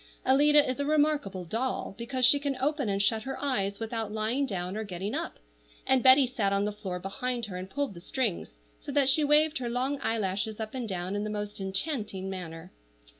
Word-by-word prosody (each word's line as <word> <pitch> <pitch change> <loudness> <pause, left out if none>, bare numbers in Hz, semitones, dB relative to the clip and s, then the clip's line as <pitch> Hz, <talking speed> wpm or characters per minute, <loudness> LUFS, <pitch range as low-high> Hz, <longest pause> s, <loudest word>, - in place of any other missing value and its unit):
Alida 290 +2 +5
is 255 +2 -2
a 285 - 0
remarkable 290 -12 +1
doll, 230 +5 -2
because 245 +3 0
she 285 +3 +6
can 280 -2 -2
open 280 -3 0
and 195 0 0
shut 220 +2 +2
her 270 +3 -5
eyes 200 -8 -1
without 225 -1 -3
lying 220 +6 0
down 185 -3 -3
or 220 - -2
getting 195 0 -4
up; - - -3 0.5
and 265 -1 +3
Betty 260 +2 +7
sat 220 -5 -1
on 200 +1 +1
the 210 - -1
floor 200 -3 -5
behind 235 +6 -3
her 195 -4 -7
and 185 +1 -6
pulled 285 -1 -2
the 170 - -10
strings, 225 -2 -2 0.3
so - - -7
that 275 -2 +4
she 305 +3 +2
waved 300 +1 +4
her 245 -2 -3
long 260 +4 -1
eyelashes 215 -1 -1
up 220 -1 -5
and 250 -4 -4
down 185 +1 -3
in 205 - -1
the 215 - -3
most 210 -1 -4
enchanting 195 -2 -2
manner. 175 -1 -7
225 Hz, 210 wpm, -29 LUFS, 195-270 Hz, 0.5 s, Betty